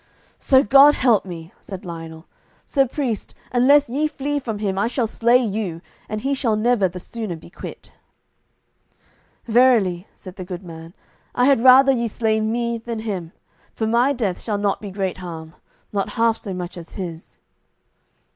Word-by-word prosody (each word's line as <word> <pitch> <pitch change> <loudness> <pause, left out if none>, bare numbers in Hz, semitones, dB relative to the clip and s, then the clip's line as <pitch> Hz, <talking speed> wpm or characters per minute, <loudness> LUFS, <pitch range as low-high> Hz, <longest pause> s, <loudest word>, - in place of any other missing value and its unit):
"So 265 0 +4
God 275 +6 +7
me - - -7
help," 185 -8 0
said 190 -1 -8
Lionel, 165 -1 -8 0.4
"sir 275 -2 +2
priest, 240 -5 -3 0.2
unless 275 +4 +5
ye 285 +6 0
flee 290 -1 -3
from 225 -6 -4
him 200 -2 -2
I 200 +3 +1
shall 245 0 -1
slay 235 +2 +3
you, 210 -8 -2 0.3
and 215 0 -3
he 275 +3 0
shall 245 -5 0
never 215 -2 +2
the 180 +1 -8
sooner 215 -1 -6
be 160 +1 -14
quit." - - -10 1.5
"Verily," 220 -7 +3
said 185 -1 -12
the 185 - -5
good 180 0 -7
man, 165 0 -11 0.4
"I 250 - +3
had 270 -4 +4
rather 265 +1 +8
ye 235 -3 0
slay 220 0 0
me 235 +2 -1
than 230 -1 -5
him, 190 -7 -4 0.4
for 220 - -1
my 235 +5 +3
death 215 -9 -2
shall 210 -3 -2
not 200 -1 -1
be 205 - -6
great 190 -1 -3
harm, 165 -3 -8 0.4
not 200 -1 -2
half 230 0 +3
so 205 - -7
much 180 -1 -6
as 165 - -12
his." 170 -4 -7
220 Hz, 170 wpm, -21 LUFS, 185-245 Hz, 1.5 s, rather